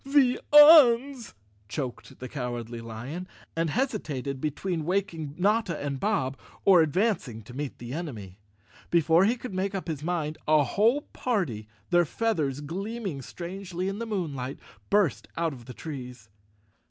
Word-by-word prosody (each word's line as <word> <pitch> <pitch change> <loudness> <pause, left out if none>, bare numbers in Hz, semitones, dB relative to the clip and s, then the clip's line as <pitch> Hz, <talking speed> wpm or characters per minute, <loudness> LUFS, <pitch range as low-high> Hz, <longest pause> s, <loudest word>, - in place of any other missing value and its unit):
"The 275 -2 +3
Uns," 280 -5 +7 0.3
choked 130 0 -5
the 130 - -7
Cowardly 120 -3 -5
Lion, 120 +11 -6 0.3
and 165 0 0
hesitated 145 - -2
between 160 +3 -2
waking 165 -4 -2
Notta 205 -2 +1
and 140 -2 -3
Bob, 140 - -1 0.3
or 185 -4 +7
advancing 160 - 0
to 125 - -12
meet 140 +1 -5
the 120 +1 -7
enemy. 110 - -6 0.5
Before 170 +2 +4
he 230 +4 +2
could 245 -3 -7
make 190 +2 -1
up 190 - -4
his 150 -3 -4
mind, 160 -3 -2
a 155 -1 +5
whole 225 - +2
party, 175 - -2 0.2
their 175 0 +5
feathers 150 - -1
gleaming 190 0 -4
strangely 180 +4 -5
in 195 +2 -3
the 230 - -4
moon¬ 185 -9 -2
light, 130 +1 -5 0.3
burst 200 -7 +2
out 165 -2 0
of 120 -3 -12
the 125 - -9
trees. 125 -8 -8
165 Hz, 150 wpm, -27 LUFS, 135-200 Hz, 0.5 s, Uns